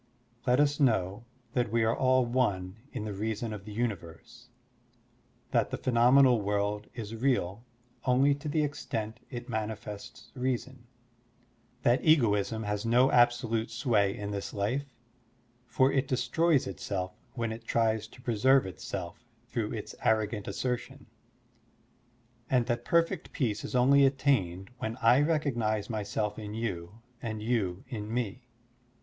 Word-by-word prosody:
Let 125 +2 +4
us 145 0 +3
know 110 -5 +1 0.3
that 120 -4 0
we 115 0 +2
are 110 +1 +2
all 130 -1 +3
one 105 -6 0
in - - -4
the 105 - -4
reason 110 +2 -3
of 100 -2 -8
the 105 - -8
universe, 105 -7 -5 1.0
that - - +2
the - - -3
phenomenal 125 0 +5
world 105 +1 -1
is 110 -3 -6
real 115 -4 0 0.4
only 135 +2 +4
to 145 +2 -5
the 150 +1 +1
extent 115 -6 -4
it 120 -2 -7
manifests 105 -3 -6
reason, 130 -1 -3 1.0
that 120 +2 +3
egoism 110 -7 +3
has 105 0 -2
no 120 +3 +4
absolute 120 -2 +3
sway 110 -4 +1
in 105 0 -4
this 100 -1 -4
life, 115 +8 -1 0.8
for 130 +2 +3
it 135 0 +1
destroys 135 +4 +2
itself 95 -1 -4 0.2
when 115 -2 -2
it 115 +1 -7
tries 110 -2 +1
to 125 +2 -17
preserve 130 +3 +4
itself 90 0 -6 0.3
through 115 -4 -2
its 110 -3 -5
arrogant 110 -1 +1
assertion, 130 +2 -3 1.4
and 125 -2 +3
that 120 -1 -1
perfect 170 +1 +1
peace 115 -8 -1
is - - -5
only 140 +3 +5
attained 115 -9 0
when 110 +2 -3
I 125 +3 +5
recognize 120 -9 0
myself 105 0 -2
in 105 0 -6
you 100 -2 -4 0.2
and 110 -2 -4
you 105 -5 -1
in 110 -4 -5
me. 120 +1 -3
115 Hz, 140 wpm, -30 LUFS, 105-130 Hz, 1.4 s, phenomenal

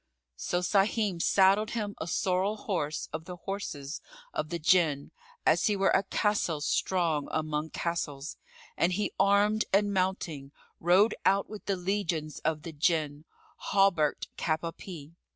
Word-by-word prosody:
So 175 - -1
Sahim 195 -1 +1
saddled 195 +4 +4
him 205 -2 -2
a 160 - -4
sorrel 190 +4 0
horse 165 -8 -2
of 160 +1 -5
the 180 0 -7
horses 170 -7 -5 0.3
of 155 - -2
the 170 - -2
Jinn, 160 -4 +2 0.3
as - - +4
he 210 - +2
were 195 0 +2
a - - +4
castle 200 -5 0
strong 160 -1 0
among 155 0 -2
castles, 155 -4 -3 0.4
and 175 +2 +2
he 205 +3 -1
armed 205 +2 +3
and 205 +1 +3
mounting, 175 -7 -2 0.3
rode 185 +6 +4
out 195 +2 +2
with 215 - -8
the 200 - 0
legions 175 -5 -2
of 155 -1 -1
the 165 - -7
Jinn, 150 -1 0 0.3
hauberk'd 185 -7 +1
cap 155 -1 0
à 165 -1 -5
pie. 165 -5 -10
175 Hz, 150 wpm, -29 LUFS, 155-195 Hz, 0.4 s, saddled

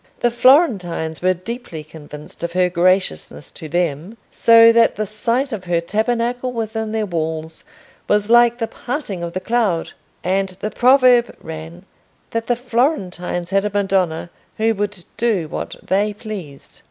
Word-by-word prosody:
The 240 - +2
Florentines 210 - +2
were 185 +1 +2
deeply 185 -4 -7
convinced 150 0 -12
of 170 0 -3
her 180 0 +2
graciousness 175 - 0
to 155 - -9
them, 175 +4 -2
so 230 0 +7
that 230 0 +4
the 215 - -2
sight 230 +6 -1
of 205 -5 -5
her 175 -1 +1
tabernacle 235 +7 -1
within 220 -2 -3
their 220 -1 -1
walls 160 -2 -4 0.4
was 210 0 +2
like 240 0 +5
the 230 - -1
parting 240 - -5
of 170 0 -5
the 185 - -2
cloud, 210 -6 0 0.3
and 190 +1 0
the 215 - -3
proverb 250 -1 +4
ran, 160 +3 -9 0.5
that 230 0 -3
the 245 - +2
Florentines 215 - -1
had 195 0 +2
a 210 - -1
Madonna 190 -5 0 0.3
who 225 +1 +2
would 205 -3 -4
do 215 -9 0
what - - -5
they 205 +3 0
pleased. 195 - -9
200 Hz, 155 wpm, -19 LUFS, 170-230 Hz, 0.5 s, so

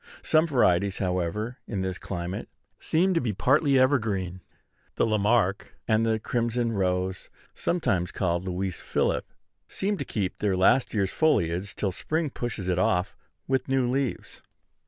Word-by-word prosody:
Some 160 +1 +3
varieties, 100 - +2
however, 95 +5 -2
in 100 -4 -3
this 95 -1 -3
climate, 90 0 -5 0.3
seem 185 +4 +2
to 165 - +2
be 115 -4 -1
partly 140 - +3
evergreen. 110 -9 +1 0.5
The - - +2
La 110 -1 +1
Marque 105 -2 +1
and 110 0 +3
the 110 -1 +2
crimson 120 +1 -1
rose, 95 -2 -1 0.2
sometimes 110 - 0
called 85 -1 -1
Louis 95 0 -3
Philippe, - - 0 0.4
seem 200 +1 -2
to - - -1
keep 95 -4 -3
their 100 -3 +1
last 115 +7 +3
year's 100 -2 +1
foliage 95 - +1
till 100 - -1
spring 155 - -2
pushes 115 -8 -4
it 90 -1 +1
off 90 0 +1 0.3
with 130 0 0
new 135 -2 +2
leaves. 130 0 -2
105 Hz, 150 wpm, -26 LUFS, 95-130 Hz, 0.5 s, Some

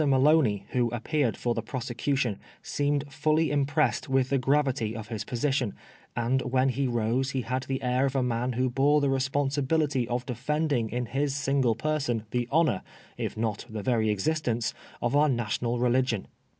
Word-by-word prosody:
Maloney, 135 -7 +4
who 120 -2 +1
appeared 120 +2 -1
for 120 - 0
the 115 - -2
prosecution, 120 -1 -2 0.2
seemed 145 0 0
fully 155 0 +2
impressed 145 +1 +1
with 130 -1 +2
the 135 - +3
gravity 135 -4 +1
of 110 -2 -7
his 110 -2 -3
position, 125 -1 -1 0.4
and 120 +3 +1
when 130 +1 +2
he 130 +2 0
rose 120 +2 0
he 135 -1 -1
had 130 +4 -2
the 135 -1 -2
air 125 +2 +2
of 135 - -4
a 130 - +2
man 125 +1 -1
who 130 +2 +1
bore 140 +4 +3
the 140 -2 +1
responsibility 140 0 +1
of 125 +1 -2
defending 140 -1 -1
in 125 +2 -2
his 135 +4 -1
single 135 -4 +1
person 140 -5 -1
the 120 -1 -1
honor, 155 - +3 0.3
if - - -4
not 110 0 -2
the 110 -2 -5
very 110 -2 +2
existence, 120 +1 0 0.3
of 120 +3 +1
our 150 +1 +5
national 120 0 -1
religion. 125 -3 +1
130 Hz, 170 wpm, -28 LUFS, 120-140 Hz, 0.4 s, our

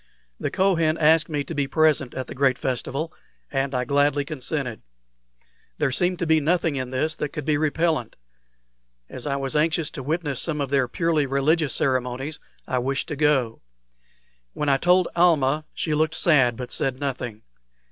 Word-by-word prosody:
The - - -2
Kohen 165 -5 +2
asked 160 0 +4
me 145 -2 -1
to 165 - -7
be 145 -3 -1
present 150 -3 +2
at 130 - -3
the - - -8
great 135 -1 +2
festival, 135 +5 -3 0.4
and 135 -1 -1
I 125 0 0
gladly 145 +1 +2
consented. 135 -5 -4 1.0
There 135 - +1
seemed 180 +6 +1
to 175 - -2
be 160 0 +4
nothing 165 0 +1
in 130 -2 -3
this 155 +5 -1
that 150 - -2
could 150 -1 -6
be 155 - +2
repellent. 155 -3 0 1.0
As 130 - -6
I 140 - 0
was 135 -1 -2
anxious 160 +1 +1
to 135 - -6
witness 150 0 -2
some 155 -3 -1
of 140 -2 -2
their 135 -3 +2
purely 160 +1 0
religious 140 +2 +1
ceremonies, 130 +2 -1 0.3
I 130 - 0
wished 135 +5 -2
to 150 - -3
go. 135 -6 +1 0.9
When 150 - -1
I 135 - +4
told 180 +3 +3
Almah, 155 -4 +3
she 155 - -2
looked 155 +1 +1
sad, 135 -8 +4
but 125 -1 -6
said 130 -1 -1
nothing. 125 -6 -4
145 Hz, 175 wpm, -24 LUFS, 135-160 Hz, 1.0 s, asked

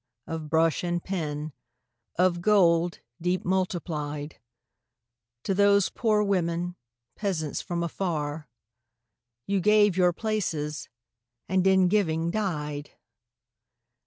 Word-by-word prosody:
Of 160 -2 -5
brush 160 0 +2
and 175 -1 -1
pen, 155 -5 -3 0.6
of 175 -1 +2
gold 175 -4 +3 0.2
deep 180 +2 0
multiplied, 155 -6 -2 1.0
To 195 - 0
those 200 0 +4
poor 215 -2 +1
women, 175 -3 -1 0.4
peasants 165 -8 -2
from 170 -2 -3
afar. 155 -5 -3 1.0
You 200 0 +1
gave 210 -1 +4
your 180 -1 +4
places, 165 -8 -3 0.6
and 190 +1 +2
in 190 -1 +5
giving 170 -4 +1
died 150 -8 -3
175 Hz, 100 wpm, -27 LUFS, 160-195 Hz, 1.0 s, in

